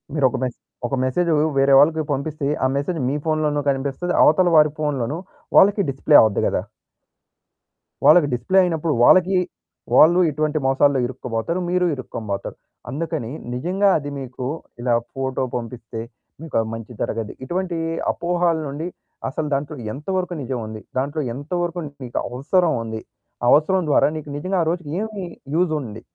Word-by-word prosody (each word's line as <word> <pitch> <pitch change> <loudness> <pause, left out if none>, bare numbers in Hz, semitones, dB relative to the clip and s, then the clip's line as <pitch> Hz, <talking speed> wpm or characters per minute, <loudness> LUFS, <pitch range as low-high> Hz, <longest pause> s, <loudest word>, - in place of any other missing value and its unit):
మీరొక 130 -4 +2
మెసె 125 -2 -3 0.3
ఒక 135 - -1
మెసేజు 165 +6 +1 0.2
వేరే 135 0 +4
వాళ్ళకి 155 +2 +4
పంపిస్తే, 140 +1 -3 0.2
ఆ - - +5
మెసేజు 150 +4 -1
మీ 140 - -1
ఫోన్‌లోనూ 155 -2 +1
కనిపిస్తది, 140 +6 -1
అవతలి 175 +2 +4
వారి 150 -1 +6
ఫోన్‌లోను 145 -1 -1 0.4
వాళ్ళకి 200 +1 +6
డిస్‌ప్లే 140 +2 +5
అవ్వుద్ది 110 -2 +2
గదా! - - 0 1.4
వాళ్ళకి 170 -5 +7
డిస్‌ప్లే 185 +11 +2
అయినప్పుడు 165 -3 0
వాళ్ళకి 185 +4 +5 0.6
వాళ్ళు 175 +3 +7
ఇటువంటి 155 +1 -1
మోసాల్లో 135 +1 +3
ఇరుక్కోబోతారు, 125 +6 -3
మీరు 180 0 +2
ఇరుక్కోనిబోతారు. 105 -6 -5 0.3
అందుకని 150 -3 -3 0.2
నిజంగా 185 +10 +1
అది 145 -2 -5
మీకు 130 -1 -6 0.4
ఇలా 120 0 +1 0.2
ఫోటో 130 -1 -2
పంపిస్తే 115 -1 -6 0.4
మీకు 160 -2 -8
ఆ - - +3
మంచి 115 +2 -7
జరగది. 110 -1 -3
ఇటువంటి 175 +4 -2 0.3
అపోహలనుండి 165 -3 -1 0.4
అసలు 150 +3 -3
దాంట్లో 145 +3 -2 0.2
ఎంత 145 +2 -10
వరకు 180 -1 -2
నిజముంది. 115 -4 -5 0.2
దాంట్లో 140 +4 -1
ఎంతవరకు 175 +6 -3 0.2
నీకు 120 - -3
అవసరముంది. 125 - 0 0.4
ఆ - - +1
అవసరం 185 +6 +4
ద్వారా 145 - +4
నీకు 155 -1 -8
నిజంగా 185 +5 -1
ఆ - - -3
రోజుకి 170 -4 -5
ఏమి 215 -3 -5 0.3
యూజ్ 175 -1 +2
ఉంది. 110 -4 -8
145 Hz, 140 wpm, -22 LUFS, 130-170 Hz, 1.4 s, వాళ్ళకి